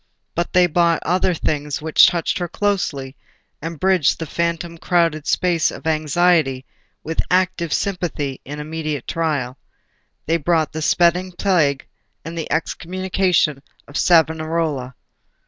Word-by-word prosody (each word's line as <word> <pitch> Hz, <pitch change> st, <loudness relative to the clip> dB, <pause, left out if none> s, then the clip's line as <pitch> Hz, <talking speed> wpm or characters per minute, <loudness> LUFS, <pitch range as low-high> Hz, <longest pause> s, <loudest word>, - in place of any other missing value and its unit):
But 170 Hz, +1 st, -2 dB
they 180 Hz, -1 st, +6 dB
brought 170 Hz, -1 st, +2 dB
other 180 Hz, +1 st, +1 dB
things 150 Hz, -2 st, -2 dB
which 155 Hz, 0 st, +5 dB
touched 170 Hz, +1 st, -1 dB
her 175 Hz, -, -2 dB
closely, 165 Hz, -9 st, -2 dB, 0.5 s
and 165 Hz, 0 st, -6 dB
bridged 185 Hz, -5 st, +3 dB
the 165 Hz, -, -4 dB
phantom 170 Hz, +1 st, -3 dB
crowded 165 Hz, -5 st, +1 dB
space 170 Hz, 0 st, +2 dB
of 140 Hz, -, -9 dB
anxiety 155 Hz, -3 st, +2 dB, 0.4 s
with 160 Hz, +1 st, -1 dB
active 180 Hz, -3 st, +1 dB
sympathy 165 Hz, -9 st, -2 dB
in 145 Hz, +2 st, -7 dB
immediate 155 Hz, -2 st, -4 dB
trial. 140 Hz, -6 st, -2 dB, 0.7 s
They 165 Hz, +2 st, +2 dB
brought 160 Hz, -1 st, +1 dB
the 160 Hz, -, -5 dB
spreading 180 Hz, +3 st, +2 dB
Plague 170 Hz, -8 st, +1 dB, 0.4 s
and 165 Hz, +1 st, -6 dB
the 165 Hz, -2 st, -5 dB
Excommunication 180 Hz, -2 st, 0 dB, 0.3 s
of 145 Hz, -, -14 dB
Savonarola. 160 Hz, -6 st, +1 dB
165 Hz, 130 wpm, -20 LUFS, 150-175 Hz, 0.7 s, they